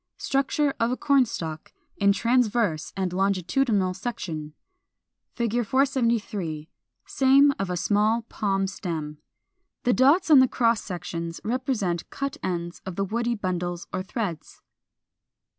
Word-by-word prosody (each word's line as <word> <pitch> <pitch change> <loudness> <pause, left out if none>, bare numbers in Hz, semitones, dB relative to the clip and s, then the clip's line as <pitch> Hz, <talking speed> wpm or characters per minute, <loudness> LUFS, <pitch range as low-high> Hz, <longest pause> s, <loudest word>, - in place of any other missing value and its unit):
Structure 275 +1 0
of 230 - +2
a 250 - -1
Corn 280 -3 +4
stalk, 160 -5 -6 0.2
in 200 0 +3
transverse 225 -7 +1
and 185 -2 -1
longitudinal 195 +2 +1
section. 160 -9 -5 0.8
473. 230 - 0 0.4
Same 275 +1 +4
of 195 -1 -2
a 180 - -1
small 215 +5 +2
Palm 195 -3 -1
stem. 160 -6 -5 0.6
The 245 - +3
dots 300 +9 +4
on 290 - +9
the 260 - +6
cross 230 -2 +1
sections 170 -2 -5
represent 225 -7 -1
cut 275 0 -4
ends 175 -2 -4
of 190 -2 -6
the 195 - -1
woody 235 +4 -1
bundles 180 -3 -3
or 185 - -1
threads. 190 -4 -5
205 Hz, 125 wpm, -25 LUFS, 180-245 Hz, 0.8 s, on